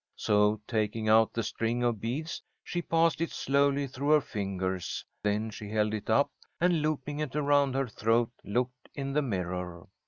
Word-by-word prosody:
So, 105 +1 +3
taking 110 -1 0
out 110 0 +6
the 115 - -2
string 115 +3 -1
of 120 -4 0
beads, 145 +9 -3 0.2
she 175 - -2
passed 165 -1 +2
it 165 - 0
slowly 140 +1 +2
through 140 +2 -3
her 155 - +7
fingers. 95 -5 -3 0.2
Then 105 +2 0
she 105 -1 -8
held 105 0 +1
it 110 0 -4
up, 140 +6 +3 0.3
and, 175 -2 +3
looping 150 -1 -2
it 150 -3 -3
around 145 -2 +3
her 135 -1 +1
throat, 115 +1 +1
looked 125 +4 -2
in 135 -1 -3
the 150 - +3
mirror. 90 -7 -3
120 Hz, 175 wpm, -30 LUFS, 105-140 Hz, 0.3 s, her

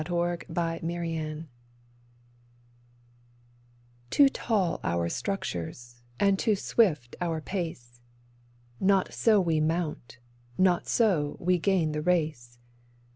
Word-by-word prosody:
THE 175 +1 -1
FAITH 165 0 -2
WE 165 - -3
NEED 160 -2 -4 2.6
TOO 280 -1 +6
tall 205 -9 0
our 85 0 0
structures, 120 - -4 0.2
and 200 -1 +3
too 220 -3 +2
swift 160 - +1
our 165 -2 -1
pace; 150 -9 -5 0.8
Not 190 -1 +2
so 220 -3 +4
we 165 -4 +1
mount, 155 -5 -2 0.4
not 185 -2 +3
so 180 -11 +1
we 180 +1 +2
gain 175 -4 +1
the 150 0 -2
race. 150 -8 -1
165 Hz, 105 wpm, -28 LUFS, 150-190 Hz, 2.6 s, TOO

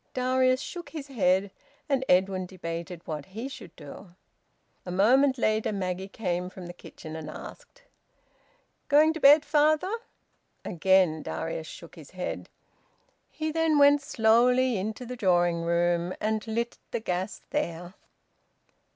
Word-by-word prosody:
Darius 255 0 +2
shook 350 +2 -7
his 290 -3 -8
head, 190 -5 +1 0.4
and 275 -2 +1
Edwin 185 0 +2
debated 170 -1 -7
what 150 -2 -5
he 240 +4 -3
should 270 - -11
do. 170 +5 -12 0.7
A - - -8
moment 260 +9 +4
later, 215 -2 +1
Maggie 190 -1 -3
came 180 -3 -3
from 185 -1 -10
the 175 - -8
kitchen 160 -2 -11
and 155 -1 -7
asked - - -11 1.0
"Going 305 +2 +5
to 325 - -6
bed, 295 +1 +7
father?" 310 +5 +2 0.7
Again 180 -2 +2
Darius 160 0 -4
shook 170 - -11
his 160 -5 -13
head. 180 - -4 0.8
He 315 0 -3
then 325 -1 +2
went 285 0 +6
slowly 245 0 +3
into 215 +6 -4
the 250 +1 -6
drawing 175 -5 +2
room 170 +1 0
and 215 +1 -2
lit 235 +2 -3
the - - -2
gas 185 -2 -3
there. 175 - -3
200 Hz, 135 wpm, -27 LUFS, 175-265 Hz, 1.0 s, bed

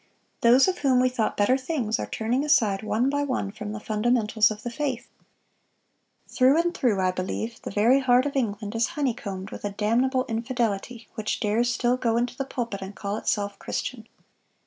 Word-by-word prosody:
Those 250 +4 +6
of 375 - -1
whom 265 -3 +3
we 255 0 +3
thought 245 -3 -1
better 205 +5 +4
things 260 -6 -1
are - - -3
turning 240 +5 -1
aside 230 -10 +3
one 220 +3 0
by 285 +1 0
one 255 -8 -2
from 210 0 -6
the 215 - -5
fundamentals 215 0 +2
of 215 0 -7
the 240 - -4
faith. 260 -2 -3 1.2
Through 265 +4 +4
and 345 +1 +1
through, 235 - +1
I 185 -1 +2
believe, 190 +5 -4
the - - -6
very 230 +7 +4
heart 255 -1 +3
of 285 - -3
England 210 -5 -2
is 230 0 +1
honeycombed 205 -9 -3
with - - -8
a 205 - -1
damnable 240 +6 +1
infidelity 230 -1 -2
which 215 -1 -3
dares 230 +3 +1
still 245 0 +1
go 230 -2 +1
into 245 +1 -1
the 275 - -3
pulpit 235 -7 -4
and 190 +1 -7
call 200 0 -3
itself 205 -2 -2
Christian." 230 -3 -4
235 Hz, 190 wpm, -25 LUFS, 210-255 Hz, 1.2 s, Those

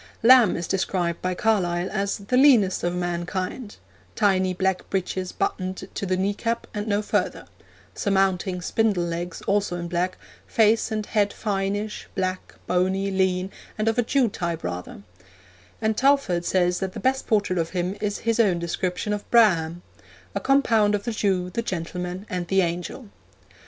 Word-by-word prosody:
Lamb 240 -3 +7
is 170 -1 -4
described 180 -3 -1
by 185 0 -1
Carlyle 180 -4 +1
as 200 0 -1
'the 200 +5 -2
leanest 250 -9 +5
of 175 0 0
mankind; 180 +5 -3 0.4
tiny 190 -2 +2
black 190 0 -1
breeches 185 -1 -2
buttoned 190 - -3
to 200 - -3
the 185 0 +1
knee 195 +2 +1
cap 230 +3 -2
and 210 +1 -3
no 205 0 +1
further, - - -1 0.5
surmounting 190 -2 0
spindle 210 -3 +1
legs 170 0 -4
also 200 -3 0
in 175 -1 -4
black, 175 +2 -1 0.3
face 225 +1 +3
and 215 -1 -2
head 205 -2 +1
fineish, 205 0 -3
black, 185 -1 -3
bony, 190 +2 +1
lean, 190 0 0 0.3
and 215 +1 -1
of 225 +2 +2
a - - +4
Jew 255 +1 +2
type 170 -5 -3
rather'; 90 +2 -6 0.8
and 220 0 +2
Talfourd 260 -10 +2
says 180 -1 +2
that 190 -1 -3
the - - -6
best 265 +1 0
portrait 205 -4 +1
of 165 0 -1
him 180 +1 -2
is 205 -1 -1
his 230 0 +1
own 195 -6 +4
description 180 +4 -2
of 205 - -5
Braham 175 -7 +3 0.5
'a - - -1
compound 225 -7 +3
of 200 - -3
the 235 - -2
Jew, 190 -4 0
the 230 - -1
gentleman, 180 0 -4
and 180 -1 -3
the 195 +1 +3
angel.' 180 +7 -4
190 Hz, 165 wpm, -24 LUFS, 180-215 Hz, 0.8 s, Lamb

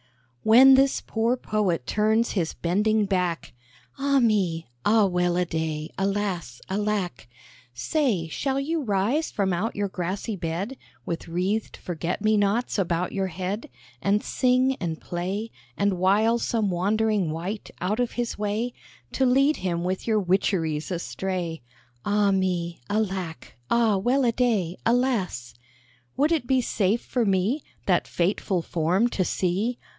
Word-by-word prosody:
"When 255 +5 +8
this 270 +1 +4
poor 230 +3 0
Poet 195 - -1
turns 220 - +2
his 170 -6 -1
bending 210 +5 +1
back, 180 -8 -1 0.5
(Ah 280 0 +3
me! 190 -9 +1 0.2
Ah, 215 -1 +4
well 180 -1 +1
a 180 - +2
day! 160 -2 -3
Alas! 195 - -2
Alack!) 195 - -2 0.5
Say, 220 - 0
shall 270 - -1
you 315 +4 -1
rise 230 +7 0
from 195 -3 0
out 200 +7 -2
your 205 0 0
grassy 190 +4 -3
bed, 175 +8 -3 0.3
With 170 0 -4
wreathed 185 +6 -1
forget 175 +3 -4
me 215 0 +4
nots 205 +3 +1
about 175 -1 0
your 195 -1 -1
head, 190 - -4 0.3
And 205 +1 +2
sing 255 +1 +2
and 165 -3 -3
play, 190 +6 -4 0.3
And 200 -3 +1
wile 215 +5 +3
some 220 -4 0
wandering 205 +1 +1
wight 175 +7 -4
out 205 +6 -1
of 245 -1 0
his 240 -3 -3
way, 215 +4 -1 0.4
To 265 - +2
lead 275 +4 +4
him 175 -2 -2
with 185 +4 -2
your 220 -2 +3
witcheries 175 -5 0
astray? 180 -1 -3 0.4
(Ah 205 -1 +2
me! 180 -5 -1
Alas! 215 -1 +1
Alack! 180 -4 -6
Ah, 225 -4 +3
well 250 +7 +2
a 235 - +4
day!) 220 -8 0 1.4
Would 295 +4 +3
it 310 -7 0
be 260 -1 +3
safe 215 -1 +1
for 245 - -1
me 200 +8 +1 0.2
That 180 -3 +2
fateful 180 0 0
form 175 +8 +1
to 190 - 0
see?" 195 +8 -1
200 Hz, 145 wpm, -25 LUFS, 180-225 Hz, 1.4 s, When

